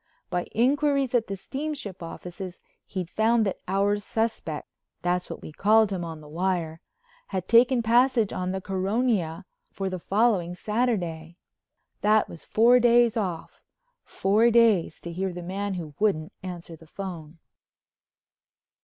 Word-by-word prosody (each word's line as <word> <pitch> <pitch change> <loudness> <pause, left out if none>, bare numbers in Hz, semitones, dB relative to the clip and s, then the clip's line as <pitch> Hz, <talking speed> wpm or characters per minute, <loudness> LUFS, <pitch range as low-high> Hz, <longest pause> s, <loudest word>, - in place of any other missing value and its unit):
By 175 0 -1
inquiries 275 +2 +2
at 235 -2 +2
the 195 - -4
steamship 270 - -5
offices 180 +2 -8 0.3
he'd 185 -4 -4
found 220 +4 +2
that 195 - -2
Our 200 +2 +1
Suspect—that's 180 -4 -3
what - - -7
we - - -8
called 215 +5 +4
him 185 -3 -2
on 165 -2 -7
the 150 - -13
wire—had 185 - -4
taken 240 +1 +5
passage 235 -1 +3
on 185 0 -2
the 190 0 -3
Caronia 195 -2 -1 0.2
for 195 -1 -4
the 185 - -4
following 195 -3 +1
Saturday. 180 -7 -2 0.6
That 215 +1 +4
was 165 - -10
four 240 +3 +5
days 240 -1 +4
off—four 220 - -1
days 225 -9 +3
to 170 - -6
hear 190 +2 -2
the 175 0 -7
man 195 +2 -3
who 160 -4 -6
wouldn't 180 -7 0
answer 175 -2 -7
the 160 0 -17
phone. 170 -4 -7
195 Hz, 135 wpm, -26 LUFS, 175-230 Hz, 0.6 s, taken